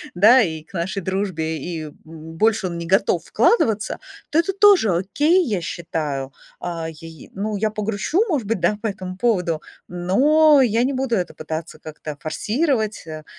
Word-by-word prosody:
да, 220 Hz, +8 st, +7 dB
и 160 Hz, -7 st, -2 dB
к 165 Hz, -, -25 dB
нашей 185 Hz, +3 st, -3 dB
дружбе, 185 Hz, -4 st, -2 dB
и, 165 Hz, -3 st, -5 dB
м, 155 Hz, -, -8 dB
больше 165 Hz, +7 st, -1 dB
он 170 Hz, -1 st, -5 dB
не 170 Hz, -, -6 dB
готов 195 Hz, +2 st, +2 dB
вкладываться, 220 Hz, -, +1 dB, 0.3 s
то 310 Hz, -, +3 dB
это 340 Hz, +4 st, 0 dB
тоже 395 Hz, -, +5 dB
окей, 295 Hz, -, +2 dB
я 200 Hz, -7 st, -1 dB
считаю. 150 Hz, -6 st, -4 dB, 0.3 s
А, 165 Hz, -2 st, -4 dB
яй 160 Hz, 0 st, -12 dB
Ну, 210 Hz, +2 st, -3 dB
я 215 Hz, +2 st, 0 dB
погрущу, 215 Hz, -, -1 dB
может 285 Hz, -, -1 dB
быть, 225 Hz, -2 st, -1 dB
да, 175 Hz, +5 st, +1 dB
по 225 Hz, -, -1 dB
этому 185 Hz, -2 st, -6 dB
поводу, 180 Hz, -8 st, 0 dB, 0.3 s
но 275 Hz, -, +4 dB
я 230 Hz, -1 st, +2 dB
не 270 Hz, +2 st, 0 dB
буду 260 Hz, -2 st, 0 dB
это 180 Hz, -4 st, -2 dB
пытаться 160 Hz, +1 st, -6 dB
как-то 150 Hz, -1 st, -8 dB
форсировать, 220 Hz, -, -1 dB
э, 155 Hz, -1 st, -7 dB
195 Hz, 170 wpm, -21 LUFS, 165-230 Hz, 0.3 s, да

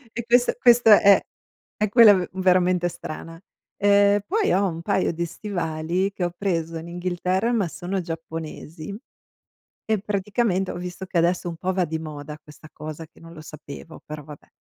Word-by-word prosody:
E 235 Hz, -, -3 dB
quest 245 Hz, +1 st, +3 dB
questo 240 Hz, -2 st, +5 dB
è 200 Hz, -1 st, +7 dB, 0.6 s
è 215 Hz, -, +2 dB
quella 225 Hz, -1 st, +8 dB
v 185 Hz, -2 st, 0 dB
veramente 180 Hz, -1 st, +2 dB
strana. 165 Hz, 0 st, -8 dB, 0.4 s
Ehm, 200 Hz, 0 st, +5 dB
poi 425 Hz, +1 st, +1 dB
ho 195 Hz, +1 st, +2 dB
un 165 Hz, -2 st, -5 dB
paio 175 Hz, +1 st, 0 dB
di 170 Hz, +1 st, -2 dB
stivali 175 Hz, 0 st, -2 dB
che 190 Hz, -2 st, -2 dB
ho 175 Hz, -, -3 dB
preso 165 Hz, -4 st, -2 dB
in 160 Hz, +1 st, -8 dB
Inghilterra, 180 Hz, +5 st, -1 dB
ma 210 Hz, -6 st, +1 dB
sono 185 Hz, +3 st, -4 dB
giapponesi. 165 Hz, +1 st, -7 dB, 0.9 s
E, 220 Hz, -1 st, +1 dB
praticamente 200 Hz, -1 st, -1 dB
ho -, -, -6 dB
visto 180 Hz, +1 st, -6 dB
che 180 Hz, -, -3 dB
adesso 175 Hz, +1 st, +1 dB
un 165 Hz, -, -7 dB
po' 185 Hz, +3 st, -2 dB
va 185 Hz, -1 st, +1 dB
di 160 Hz, 0 st, -4 dB
moda 150 Hz, -1 st, -8 dB
questa 150 Hz, +1 st, -15 dB
cosa 155 Hz, +1 st, -8 dB
che -, -, -23 dB
non 165 Hz, 0 st, -13 dB
lo 155 Hz, -, -11 dB
sapevo, 155 Hz, 0 st, -11 dB
però, 150 Hz, -1 st, -8 dB
vabbè. 145 Hz, 0 st, -13 dB
180 Hz, 175 wpm, -23 LUFS, 165-200 Hz, 0.9 s, quella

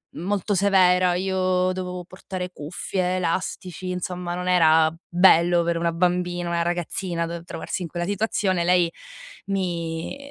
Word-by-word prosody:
molto 200 Hz, +3 st, -1 dB
severa, 185 Hz, -2 st, +4 dB
io 185 Hz, 0 st, +1 dB
dovevo 180 Hz, -1 st, -5 dB
portare 185 Hz, 0 st, -6 dB
cuffie, 180 Hz, +3 st, -3 dB
elastici, 185 Hz, +1 st, -3 dB
insomma 180 Hz, -1 st, -4 dB
non 180 Hz, +1 st, -4 dB
era 160 Hz, -3 st, +5 dB, 0.2 s
bello 175 Hz, -1 st, +5 dB
per 170 Hz, 0 st, 0 dB
una 170 Hz, 0 st, 0 dB
bambina, 175 Hz, 0 st, 0 dB
una 170 Hz, 0 st, 0 dB
ragazzina, 175 Hz, 0 st, -2 dB
dov 170 Hz, 0 st, -6 dB
trovarsi 175 Hz, +1 st, -5 dB
in 170 Hz, -, -4 dB
quella 175 Hz, +2 st, -4 dB
situazione. 200 Hz, -3 st, 0 dB
Lei 175 Hz, -1 st, +3 dB, 0.6 s
mi 170 Hz, 0 st, -2 dB
180 Hz, 135 wpm, -24 LUFS, 170-185 Hz, 0.6 s, era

